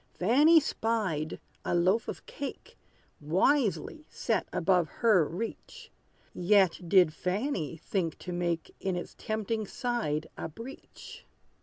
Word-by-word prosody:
Fanny 290 - +6
spied, 210 - -1 0.2
a - - 0
loaf 185 +6 +2
of - - -6
cake, 280 - -7 0.4
Wisely 220 - +1
set - - -1
above 180 -2 +2
her 215 -8 +3
reach; 230 - -7 0.4
Yet 190 -1 +3
did 180 -5 +5
Fanny 180 - -2
think 170 -1 -2
to 180 - -7
make 175 -2 -2
In 190 -2 -1
its 175 - -5
tempting 220 -1 -2
side 220 - -2
a - - -5
breach. 230 - -11
190 Hz, 120 wpm, -29 LUFS, 170-230 Hz, 0.4 s, Fanny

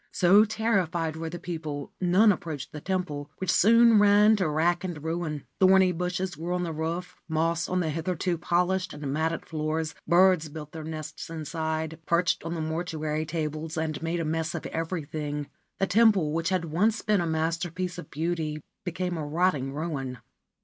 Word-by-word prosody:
So 195 +4 +6
terrified 190 -8 0
were 160 0 -4
the 175 - -6
people, 155 -5 -5
none 190 +5 +5
approached 160 -7 -4
the 150 - -7
temple, 180 -6 -3
which 190 -2 0
soon 230 +1 +6
ran 210 +1 +6
to 185 -5 +1
rack 170 +4 +1
and 170 -5 -5
ruin. 160 -3 -3
Thorny 190 -1 +6
bushes 180 +2 -2
grew 170 +4 -3
on 180 - -1
the 165 -2 -3
roof, 165 +3 -3
moss 165 +1 0
on 185 0 +1
the 160 -2 -1
hitherto 170 +1 -1
polished 180 +2 0
and 145 -2 -4
matted 160 +2 -1
floors; 155 0 -2
birds 175 -1 +4
built 150 0 -8
their 160 -1 -7
nests 155 -1 -6
inside, 160 0 -3
perched 175 +2 +2
on 165 +1 -3
the 165 - -3
mortuary 155 -1 -2
tablets, 155 0 -3
and 155 -2 -2
made 165 +1 -1
a 165 - -1
mess 160 +1 -1
of 165 - -5
everything; 155 -3 -3 0.3
the 195 - +2
temple, 205 -7 +4
which 165 +2 0
had 185 -3 0
once 205 +8 +1
been 210 -3 +2
a 170 - -1
masterpiece 170 +3 -2
of 150 - -9
beauty, 160 -1 -2 0.2
became 180 -1 -2
a 155 - -3
rotting 150 -3 +1
ruin. 140 -4 -4
165 Hz, 175 wpm, -27 LUFS, 155-180 Hz, 0.3 s, So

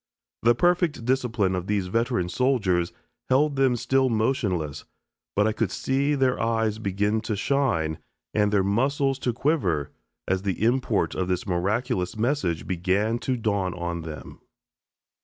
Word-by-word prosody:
The 120 +1 +4
perfect 175 -4 +1
discipline 120 -6 +1
of 90 0 -3
these 100 -2 0
veteran 95 -2 0
soldiers 95 -5 +1 0.4
held 140 +3 +3
them 135 -2 +3
still 130 +2 +2
motionless, 105 - -1 0.5
but 105 - +3
I 110 - +2
could 110 -2 -1
see 140 +6 0
their 130 -2 +1
eyes 110 -1 0
begin 105 +1 0
to 110 - -2
shine 100 - 0 0.3
and 105 -1 +2
their 100 -2 +3
muscles 135 +6 +1
to 125 - 0
quiver 115 - 0 0.4
as 95 0 +1
the 100 +1 -2
import 120 -2 +1
of 95 - -2
this 90 -1 -1
miraculous 95 +2 -1
message 110 - 0
began 95 +6 0
to 130 0 -1
dawn 100 -5 -1
on 85 -1 -3
them. 80 -2 -9
110 Hz, 145 wpm, -25 LUFS, 95-130 Hz, 0.5 s, The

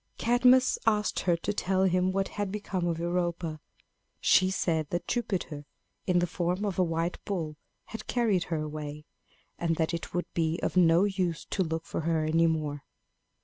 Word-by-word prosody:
Cadmus 250 +2 +4
asked 210 -1 +2
her 175 -2 +2
to 205 +5 -2
tell 190 -1 +1
him 185 0 +2
what 195 0 -1
had 205 -2 -3
become 195 -3 -2
of 165 -1 -1
Europa. 170 -2 -2 0.6
She 185 - +4
said 160 -5 0
that 175 0 -3
Jupiter, 175 -11 -2 0.4
in 180 -1 +3
the 175 - +3
form 180 +3 -1
of 190 -3 -2
a - - +5
white 165 0 -2
bull, 165 -7 -3 0.3
had 225 -1 -8
carried 215 -8 +1
her 160 -3 -2
away, 150 0 -6 0.5
and 165 -1 +1
that 160 +1 0
it 170 - -4
would 175 - -1
be 165 0 0
of - - -1
no 170 0 +5
use 185 -5 -1
to 195 - 0
look 160 -1 -2
for - - -3
her 160 -1 0
any 165 +2 +3
more. 150 -3 -2
175 Hz, 180 wpm, -29 LUFS, 160-190 Hz, 0.6 s, a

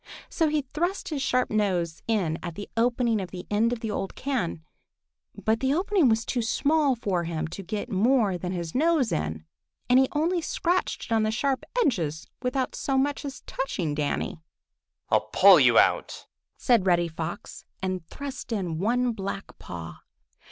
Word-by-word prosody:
He 310 -3 +2
thrust 345 +8 -2
his 295 -4 -2
sharp 255 -1 +1
nose 180 -6 0
in 185 -8 0
at 170 -2 -6
the 205 - -6
opening 235 -1 +2
in 190 - -4
the 180 0 -8
end 220 +3 +2
of 240 -2 -3
the 220 -3 -3
old 195 -1 -3
can, 235 - -2 0.7
but 220 +1 0
the 265 +2 +1
opening 365 -5 +3
was 225 0 +1
too 245 - -1
small 280 +4 +2
for 190 -7 -1
him 160 -1 -2
to 195 - -7
get 205 +3 -4
more 215 0 +3
than 180 +1 -4
his 170 -3 -4
nose 305 -4 +2
in, 80 0 -2 0.4
and 250 +1 +6
he 265 - +4
only 335 +4 +1
scratched 370 -3 -1
it - - -14
on 225 - +3
the 215 - +1
sharp 265 +4 0 0.2
edges 160 - -1 0.2
without 255 +1 -1
so 270 -1 -1
much 285 +2 0
as 275 -2 -6
touching 185 - -3
Danny. 150 +2 -2 0.7
"I'll - - +2
pull - - +8
you - - +5
out," - - +2 0.3
said 230 -7 +3
Reddy 175 -2 +3 0.7
and 185 -2 -2
thrust 280 -3 -7
in 180 -7 -2
one 245 +5 +1
black 195 -2 -5
paw. 80 -2 -8
225 Hz, 170 wpm, -26 LUFS, 180-270 Hz, 0.7 s, pull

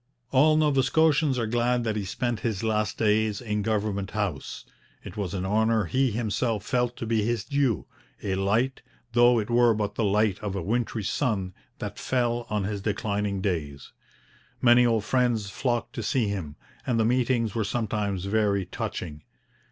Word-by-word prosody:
All 155 +4 +5
Nova 150 -3 +3
Scotians 150 -1 +3
are 115 - 0
glad 120 +2 +1
that 110 -2 -1
he 105 -2 -2
spent 120 +4 -2
his 110 -4 -2
last 110 -2 0
days 110 -1 +2
in 105 -3 -2
Government 100 -2 -1
House. 100 -11 -4 0.4
It - - -9
was 100 -2 -3
an 95 0 -2
honour 110 +1 +2
he 130 +9 +1
himself 110 -1 -1
felt 125 -1 0
to - - -4
be 110 -1 +1
his 115 0 -1
due 140 -6 0 0.4
a 95 - -1
light, 110 +7 0 0.3
though 120 0 +5
it 110 +1 -2
were 120 -1 +4
but 105 -1 -2
the 115 - -1
light 105 -1 +2
of 100 -2 -4
a 95 - -3
wintry 115 +2 -1
sun, 100 -4 -1 0.2
that - - -6
fell 120 -2 0
on 105 -2 -1
his 100 0 -3
declining 100 -1 -1
days. 75 -8 -3 0.7
Many 120 0 +6
old 115 -3 +1
friends 120 -6 +1
flocked 120 +1 -2
to - - -4
see 110 +2 0
him; 90 -8 -4 0.3
and 120 -2 0
the 110 - +3
meetings 120 -2 +1
were 115 - 0
sometimes 100 -3 -2
very 100 -2 +1
touching. 75 -4 -5
110 Hz, 175 wpm, -26 LUFS, 100-120 Hz, 0.7 s, Many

